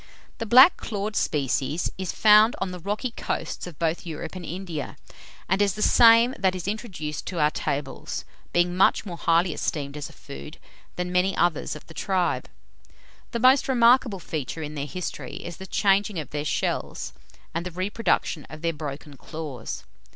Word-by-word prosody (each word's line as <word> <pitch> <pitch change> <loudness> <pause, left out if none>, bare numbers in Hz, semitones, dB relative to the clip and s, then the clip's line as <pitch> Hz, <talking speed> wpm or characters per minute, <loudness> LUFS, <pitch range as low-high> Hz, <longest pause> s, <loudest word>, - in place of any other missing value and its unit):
The 230 - -3
black 260 - +8
clawed 210 0 -4
species 145 +3 0
is 185 -1 -3
found 215 +1 +6
on 190 - -2
the 180 - -7
rocky 210 +7 -2
coasts 225 - -4
of 170 -5 -10
both 165 0 -1
Europe 165 +1 -6
and 185 - -6
India, 170 -3 -5 0.5
and 190 +3 +2
is 200 -1 +2
the 215 - -1
same 230 +1 +7
that 190 -1 +2
is 180 0 -5
introduced 190 -9 -4
to 175 - -3
our 150 0 +4
tables, 140 -2 -3 0.3
being 175 0 +2
much 190 - +3
more 180 -4 -5
highly 170 +1 +2
esteemed 140 -2 -3
as 150 0 -5
a - - -15
food 145 +3 -10 0.4
than 180 0 -3
many 180 +1 +2
others 170 -2 +1
of - - -11
the 160 - -13
tribe. 185 +2 0 0.8
The 235 - -3
most 255 +3 +5
remarkable 240 -3 +4
feature 160 -2 -5
in 150 0 -6
their 145 -1 -4
history, 180 +3 -5
is 175 -1 -7
the 190 - -9
changing 200 0 +2
of 155 - -5
their 145 0 -3
shells, - - -2 0.4
and 170 - -2
the 180 - -4
reproduction 185 -3 -1
of 155 +1 -10
their 165 0 +1
broken 145 -1 -7
claws. 150 -8 -6
180 Hz, 175 wpm, -25 LUFS, 155-205 Hz, 0.8 s, black